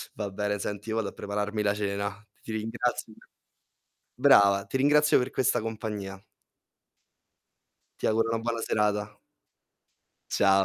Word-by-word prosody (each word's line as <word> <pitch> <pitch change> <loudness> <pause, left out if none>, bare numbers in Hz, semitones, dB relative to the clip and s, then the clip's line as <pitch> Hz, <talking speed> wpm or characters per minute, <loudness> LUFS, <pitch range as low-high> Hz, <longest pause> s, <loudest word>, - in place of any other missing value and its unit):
Va 105 -1 -3
bene. 105 +1 -2
Senti, 105 +2 -5
io 110 - -1
vado 105 -3 -1
a - - -14
prepararmi 105 +1 -3
la 100 0 +2
cena. 100 0 -3 0.2
Ti 115 - -7
ringrazio 115 +1 -2 1.0
brava, 100 -7 +5
ti - - -3
ringrazio 150 +2 +5
per 125 +1 -1
questa 130 - +1
compagnia. 105 -3 -5 1.8
Ti - - 0
auguro 115 +1 +2
una 115 - 0
buona 115 -1 -2
serata. 105 -1 0 1.1
Ciao, 95 -1 +4
105 Hz, 130 wpm, -28 LUFS, 100-115 Hz, 1.8 s, brava